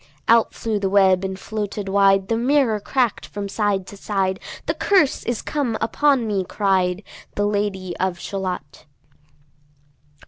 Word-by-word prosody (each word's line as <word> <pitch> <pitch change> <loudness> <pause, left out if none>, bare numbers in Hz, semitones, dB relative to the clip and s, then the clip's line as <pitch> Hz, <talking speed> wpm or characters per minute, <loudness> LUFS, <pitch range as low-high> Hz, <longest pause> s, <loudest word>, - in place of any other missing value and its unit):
Out 230 0 +5
flew 220 -2 -2
the 195 -1 0
web 190 -1 +4
and 190 0 -3
floated 205 0 -4
wide; 195 0 +3
The 225 - +1
mirror 245 -2 +2
crack'd 245 +1 -1
from 205 -1 -5
side 200 -2 0
to 200 - -11
side; 195 -1 -1 0.3
"The - - 0
curse 370 -9 +2
is 240 -2 -2
come 265 -7 -1
upon 270 +2 +2
me," 200 -3 0
cried 190 -1 0 0.3
The 205 - +1
Lady 200 -3 -2
of 185 -1 -1
Shalott. 185 -6 -5
200 Hz, 145 wpm, -22 LUFS, 190-225 Hz, 0.3 s, Out